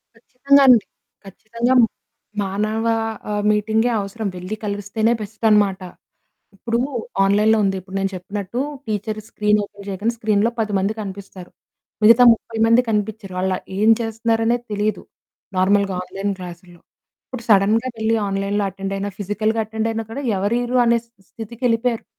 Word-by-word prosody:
కచ్చితంగా 275 +4 +2
అండి, 240 -5 +6 0.4
ఖచ్చితంగా. 230 +6 -2 0.7
మానవ 215 +3 -2 0.5
ఆహ్, 205 0 -1
మీటింగే 220 +3 +1
అవసరం. 200 +2 -4
వెళ్లి 185 +4 -5
కలిస్తేనే 205 +3 0
బెస్ట్ 215 +2 -6
అనమాట. 200 -3 +3 0.8
ఇప్పుడు 230 +4 -2 0.5
ఆన్లైన్‌లో 210 +3 +3
ఉంది. 195 -1 0
ఇప్పుడు 190 +1 -9
నేను 195 0 0
చెప్పినట్టు 200 +5 -5 0.3
టీచర్ 215 +1 -3
స్క్రీన్ 210 0 +2
ఓపెన్ 200 0 -13
చెయ్యగానే 205 +5 -1
స్క్రీన్‌లో 215 0 +2
10 215 -1 -1
మంది 195 +3 0
కనిపిస్తారు. 195 -2 -8 0.5
మిగతా 230 +3 +7
30 225 0 -5
మంది 230 +2 +5
కనిపించరు. 210 -2 -2
వాళ్ళు 185 0 0 0.2
ఏం 215 +2 +4
చేస్తున్నారనే 225 +1 0 0.2
తెలీదు. 210 +1 -1 0.5
నార్మల్‌గా 195 +1 +2
ఆన్లైన్ 195 +2 -3
క్లాస్‌లో 175 -1 -10 0.5
ఇప్పుడు 255 -3 -7
సడెన్‌గా 215 +4 +4
వెళ్లి 220 +1 +1
ఆన్లైన్‌లో 195 +1 -1
అటెండ్ 195 0 -5
అయినా, 200 +1 -3
ఫిజికల్‌గా 215 +3 -1
అటెండ్ 220 +1 -3
అయినా 225 0 -2
కూడా 280 +5 -5
ఎవరీరు 240 +6 0
అనే 235 0 +4
స్థి 220 -4 -30
స్థితికెళ్లిపోయారు. 230 +1 -2
210 Hz, 135 wpm, -20 LUFS, 195-225 Hz, 0.8 s, మిగతా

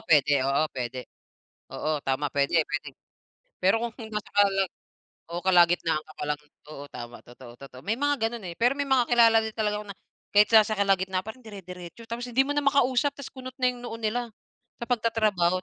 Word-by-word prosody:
pwede, 145 -2 +5 0.2
oo 140 +3 +2
pwede 130 0 -4 0.7
oo 155 -1 -2
tama 135 +2 0
pwede-pwede. 150 +1 0 0.7
Pero 195 +5 +4
kung 235 -2 -3 0.2
nasa 210 0 -5
kala 195 -1 +4 0.7
o 170 - -3
kalagitnaan 175 -3 +3
ka 155 - -14
pa - - -3
lang 150 - 0 0.3
oo 145 -2 -8
tama 120 0 -8
totoo, 120 0 -13
totoo. 135 -2 -12
May 215 - +1
mga 290 0 +1
ganon 235 -2 -8
eh, 170 - -6
pero 245 +3 +3
may - - +1
mga 255 -3 +3
kilala 230 -2 +6
din 220 -1 -5
talaga 210 -1 0
ako - - -16
na - - -27 0.4
kahit 210 0 +6
sa 220 -2 +7
sa 215 - -1
kalagitnaan 190 -2 +1
pa - - -4
rin 255 - -20
dire-diretso 180 -1 -10
tapos 240 +1 -4
hindi 260 +3 +4
mo - - -4
na 290 - +1
makausap 280 0 +3
tas 280 - -8
kunot 255 -1 -9
na 255 -1 +3
yung 245 -1 -12
noo 225 - -5
nila, 235 +2 -2 0.5
sa 235 - -3
pagtatrabaho 215 -6 +1
205 Hz, 195 wpm, -26 LUFS, 160-235 Hz, 0.7 s, sa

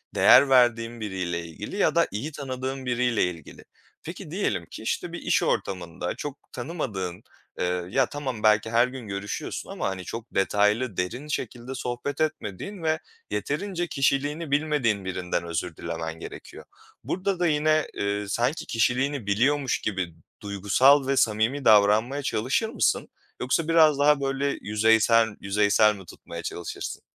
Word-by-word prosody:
değer 140 - +7
verdiğin 120 -2 +3
biriyle 90 -5 -3
ilgili 85 -1 -8
ya - - +2
da - - +4
iyi 115 +10 -4
tanıdığın 130 -1 -5
biriyle 125 -2 +1
ilgili. 85 -4 -5 0.4
Peki, - - -8
diyelim - - -1
ki, - - -10
işte, - - -2
bir - - -4
iş - - +1
ortamında 90 -2 -2
çok 145 -1 -6
tanımadığın, 115 - -4 0.4
ııı, 90 0 -1
ya 130 +5 +3
tamam, 130 -6 -5
belki 110 0 +4
her 120 +2 +4
gün 125 -3 -8
görüşüyorsun 100 +1 -5
ama, - - -2
hani, 95 -1 -5
çok 115 0 -7
detaylı, 105 +3 +2
derin 120 +11 -3
şekilde 125 -2 -4
sohbet 125 +3 -4
etmediğin 155 - -3
ve 160 0 +1 0.3
yeterince 175 - -2
kişiliğini 145 +2 0
bilmediğin 140 -10 +1
birinden 90 -2 -2
özür 85 -1 -3
dilemen 80 -1 -5
gerekiyor. - - -10 0.4
Burada 185 0 -2
da 175 - +2
yine, 155 0 +2
ııı, 100 0 -2
sanki 125 +8 0
kişiliğini 125 +3 0
biliyormuş 130 +6 +1
gibi 95 -5 -2 0.3
duygusal 105 +8 +4
ve 135 0 +1
samimi 115 +6 +1
davranmaya 110 +6 +5
çalışır 135 - 0
mısın - - 0 0.3
yoksa 145 +6 0
biraz 155 -3 +5
daha 145 0 +4
böyle 135 +1 -1
yüzeysel 110 +2 +4
yüzeysel 105 +2 +3
mi 95 -2 -12
tutmaya 85 0 -9
çalışırsın? 85 -1 -5
120 Hz, 145 wpm, -26 LUFS, 100-140 Hz, 0.4 s, değer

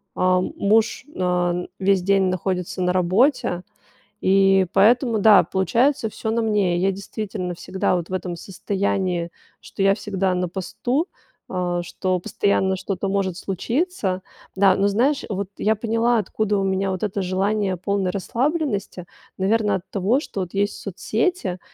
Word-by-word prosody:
а 185 0 +3
муж, 220 +6 +1
ан 180 -1 0
весь 190 -1 +3
день 195 0 +3
находится 185 0 -2
на 180 0 +1
работе, 185 - +2 0.6
и 195 0 +4
поэтому, 235 +3 +4
да, 205 -2 +7
получается 230 +6 +1
всё 220 +1 -4
на 230 - +1
мне. 205 -5 +1
Я, 190 +2 +2
действительно, 190 -2 -5
всегда 185 +1 -1
вот 175 0 -5
в - - -6
этом 180 -2 -3
состоянии, 190 -2 -2 0.3
что 195 - -4
я 195 0 +5
всегда 195 -3 -1
на 180 0 -1
посту, 245 - -2 0.4
а, 175 -1 -1
что 185 +1 -2
постоянно 190 +1 0
что-то 195 +1 -3
может 195 -2 0
случиться. 200 - -2 0.3
Да, 195 -1 +5
но 200 +1 +3
знаешь, 255 +8 +1
вот 200 -2 -3
я 220 +1 +2
поняла, 230 +2 +1
откуда 210 +1 -1
у 195 - 0
меня 195 0 0
вот 185 +1 -4
это 200 -1 -1
желание 190 +1 0
полной 195 0 -1
расслабленности. 230 - -2 0.3
Наверно 205 +1 +2
от 185 - -3
того, 210 +8 +1
что 200 - -6
вот 180 -2 -6
есть 200 +1 0
соцсети, 200 - -2
195 Hz, 150 wpm, -22 LUFS, 185-215 Hz, 0.6 s, да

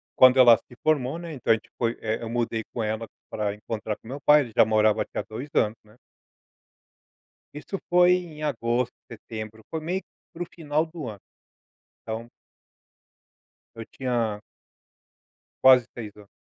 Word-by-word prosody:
quando 130 0 +7
ela 120 -3 +8
se 125 - -18
formou, 150 0 +1
né, 170 -2 -7
então, 130 -5 0
a - - +7
gente 110 - -11
foi, 115 -1 0
eh, 110 0 -1
eu 115 - -4
mudei 115 -1 -1
com 120 - -2
ela 110 +1 -2 0.2
pra 105 -2 -2
encontrar 105 0 -4
com - - -18
o - - -9
meu 140 +1 -6
pai 150 +1 +6
ele 120 -5 -5
já - - +8
morava 110 0 +3
aqui - - -23
há - - +1
2 120 +7 -6
anos, 110 +1 +2
né. 105 +2 -21 1.6
Isso 150 +7 -5
foi 180 0 +6
em 170 -4 -3
agosto, 120 -3 0 0.2
setembro. 110 -1 -8
Foi 160 - -2
meio 180 +4 -2
que - - -40 0.3
para 170 - -4
o - - -10
final 155 -1 0
do 160 -4 -7
ano. 105 -3 -7 0.8
Então 110 +1 -5 1.5
Eu 115 -1 -7
tinha 115 -5 -2 1.2
quase 130 -2 +8
6 105 -4 -8
anos. 105 -1 -15
120 Hz, 170 wpm, -26 LUFS, 110-150 Hz, 1.6 s, ela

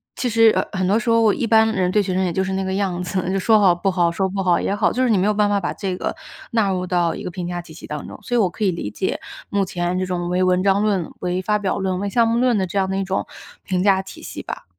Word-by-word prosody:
其 250 - -1
实， 225 0 +5
呃， - - +2
很 185 -1 0
多 200 +3 +3
时 235 0 -3
候 230 -2 +4
一 235 - -2
般 220 0 +4
人 180 -3 +1
对 210 +1 +2
学 185 -1 -2
生 190 +1 +1
也 180 - 0
就 190 +3 0
是 190 0 -3
那 190 0 -1
个 190 - -2
样 190 -3 -1
子， 180 0 -2
就 195 - 0
说 215 +3 +4
好 190 -4 +5
不 175 +3 -1
好， 175 -2 +2
说 190 +3 -1
不 195 0 -2
好 175 -2 +3
也 200 - -1
好， 205 - +2
就 255 - -1
是 255 - +2
你 215 - +3
没 185 - +2
有 210 - +2
办 205 0 +2
法 205 0 +2
把 175 - -3
这 190 -3 -4
个 - - -3 0.4
纳 225 -4 +2
入 185 -1 -1
到 175 -2 0
一 - - -7
个 - - -5
评 175 0 -5
价 175 0 -4
体 160 - -13
系 160 - -11
当 150 -1 -6
中， - - -10
所 245 +4 -3
以 - - +3
我 205 - +4
可 180 +5 -5
以 200 - +3
理 170 -12 -5
解 190 - -2 0.3
目 200 -1 +1
前 175 0 -2
这 185 - 0
种 175 -1 -3
为 180 +1 +1
文 185 0 +2
章 195 +1 +2
论、 195 -6 0
为 180 +1 -1
发 210 +3 +1
表 200 -2 -2
论、 190 -1 -1
为 200 - -2
项 230 +3 +3
目 230 +1 +1
论 245 -3 +2
的 190 - -1
这 190 - -4
样 190 -1 +2
的 190 - -1
一 195 - 0
种 190 0 -2 0.4
评 185 -2 -1
价 195 -1 +3
体 190 - -11
系 - - -7
吧。 - - -7
190 Hz, 345 characters per minute, -21 LUFS, 180-205 Hz, 0.4 s, 实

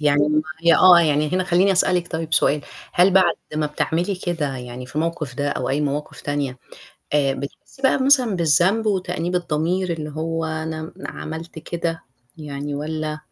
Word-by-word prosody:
يعني 145 0 +3
ما 155 0 +2 0.2
هي 170 0 +6
آه، 180 -2 +8
يعني 150 -2 +2
هنا 185 0 +1
خلّيني 180 +3 +3
أسألِك 180 -1 +2
طيب 160 -1 -1
سؤال، 145 +2 +3 0.3
هل 180 +2 +5
بعد 185 -3 +4 0.2
ما 155 0 0
بتعملي 170 +5 -1
كده 165 -7 -3
يعني 125 0 -8
في 125 - -12
الموقف 155 -4 -2
ده، 145 +1 -1
أو 130 - -2
أي 140 +2 0
مواقف 145 0 -3
تانية، 145 -3 -3 0.5
آآ 140 -2 +2
بتحسي 140 - -9
بقى 265 0 +3
مثلًا 255 -7 +4
بالذنب 180 +7 +3
وتأنيب 180 -3 -1
الضمير 175 +2 0
اللي 155 -2 -5
هو 165 +2 -3
أنا 160 0 -4
عملت 160 +1 -7
كده 165 0 -3 0.3
يعني 145 -2 -5
والّا 155 +1 -3
160 Hz, 165 wpm, -22 LUFS, 150-175 Hz, 0.5 s, آه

